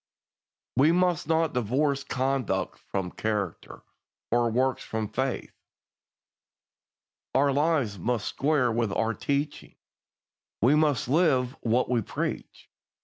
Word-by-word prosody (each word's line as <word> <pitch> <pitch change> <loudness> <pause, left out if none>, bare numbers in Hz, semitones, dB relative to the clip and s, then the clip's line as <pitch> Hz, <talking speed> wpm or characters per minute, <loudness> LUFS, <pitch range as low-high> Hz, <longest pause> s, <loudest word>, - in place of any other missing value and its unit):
We 145 +5 +5
must 175 -3 +1
not 160 -1 +1
divorce 135 +4 0
conduct 135 -2 -1
from 95 -2 -4
character, 105 -5 -3 0.5
or 120 0 +3
works 130 +3 0
from 110 -1 -3
faith. 130 0 -2 1.8
Our 140 +1 +4
lives 140 - +1
must 115 +2 -1
square 140 -4 +1
with 115 -2 0
our 115 0 0
teaching. 140 +3 -3 0.8
We 125 +7 +4
must 150 -5 +2
live 135 -4 +2
what 120 +2 +1
we 120 -2 +1
preach. - - -5
130 Hz, 110 wpm, -27 LUFS, 115-145 Hz, 1.8 s, We